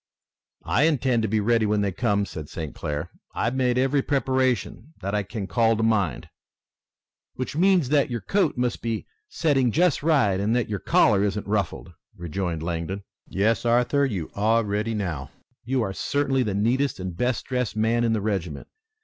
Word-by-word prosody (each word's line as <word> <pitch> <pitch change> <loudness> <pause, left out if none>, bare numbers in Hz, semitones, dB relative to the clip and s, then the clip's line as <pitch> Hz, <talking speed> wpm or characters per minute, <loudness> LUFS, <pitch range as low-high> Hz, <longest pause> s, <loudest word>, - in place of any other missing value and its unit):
"I 135 - +3
intend 130 -6 +1
to 110 - 0
be 110 +1 +1
ready 115 +1 +2
when 105 0 +1
they 100 -1 0
come," 100 0 0
said 80 -4 -8
St. 80 -3 -6
Clair. 75 +3 -4 0.2
"I've 115 +3 0
made 125 -2 +1
every 135 +2 +2
preparation 130 +1 -1
that 100 +1 -4
I 105 - +2
can 100 +1 -5
call 115 +5 +2
to 110 - 0
mind." 100 - +1 1.1
"Which 130 +2 -4
means 180 -4 +3
that 145 -2 +3
your 120 -2 -3
coat 195 -9 +1
must 125 -1 -1
be 115 -2 -3 0.2
setting 135 -7 +1
just 175 +2 +2
right 135 - +2
and 105 +4 +1
that 125 - +1
your 100 -2 -3
collar 100 +2 +3
isn't 105 0 -1
ruffled," 100 -5 -2 0.2
rejoined 85 -1 -3
Langdon. 85 +4 -3 0.2
"Yes, 105 +3 +1
Arthur, 125 +4 +2
you 100 - -2
are 110 +3 +2
ready 105 +2 -1
now. 85 -10 -3 0.4
You 130 0 0
are 95 -2 -3
certainly 135 +3 0
the 105 -5 -1
neatest 125 +6 +1
and 90 -2 -5
best 125 +5 -1
dressed 125 -4 -2
man 115 +2 +1
in 115 -1 +2
the 110 - 0
regiment. 95 -8 -3
110 Hz, 180 wpm, -25 LUFS, 100-130 Hz, 1.1 s, I